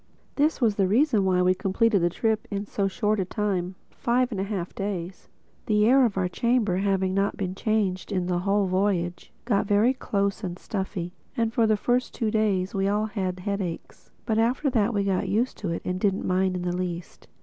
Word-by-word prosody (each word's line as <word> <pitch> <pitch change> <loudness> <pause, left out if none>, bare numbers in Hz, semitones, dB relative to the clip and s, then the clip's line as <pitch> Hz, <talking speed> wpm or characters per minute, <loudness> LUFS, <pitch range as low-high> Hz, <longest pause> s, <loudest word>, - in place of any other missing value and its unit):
This 300 +2 +1
was 225 -5 +2
the 195 -2 +3
reason 220 -1 +3
why 180 -1 +3
we 185 0 +4
completed 200 +2 +1
the 175 - +3
trip 220 +4 -1
in 200 0 -3
so 200 -1 -1
short 210 +1 0
a - - +2
time—five 210 +6 -1
and 195 -4 -2
a - - 0
half 195 -4 -4
days. 190 -2 -5 0.4
The 210 -2 +3
air 260 +3 +6
of 210 -5 -1
our 185 -1 +1
chamber, 220 -2 +1
not - - -1
having 190 -1 +1
a 195 -2 -1
change 200 -2 -1
in 185 -3 0
the 175 -1 0
whole 200 +2 +1
voyage, 185 -2 -1
got 210 -3 +1
very 210 +5 +4
close 200 -4 -2
and 180 -2 -4
stuffy; 190 -3 -4 0.2
and 225 -1 0
for 230 -2 +3
the 215 -1 +3
first 245 +4 0
two 220 -2 -1
days 200 -4 +1
we 195 0 0
all 210 +2 +1
had 185 -4 -3
headaches. 195 -4 -5 0.2
But 220 -1 +1
after 255 +5 +1
that 225 -2 +2
we 205 -3 0
got 195 -1 0
used 225 +6 0
to 200 - -3
it 165 - -3
and 180 0 -2
didn't 195 0 0
mind 185 0 +1
it 180 - -3
in - - -5
the 175 - -1
least. 175 -2 -5
200 Hz, 210 wpm, -26 LUFS, 185-220 Hz, 0.4 s, air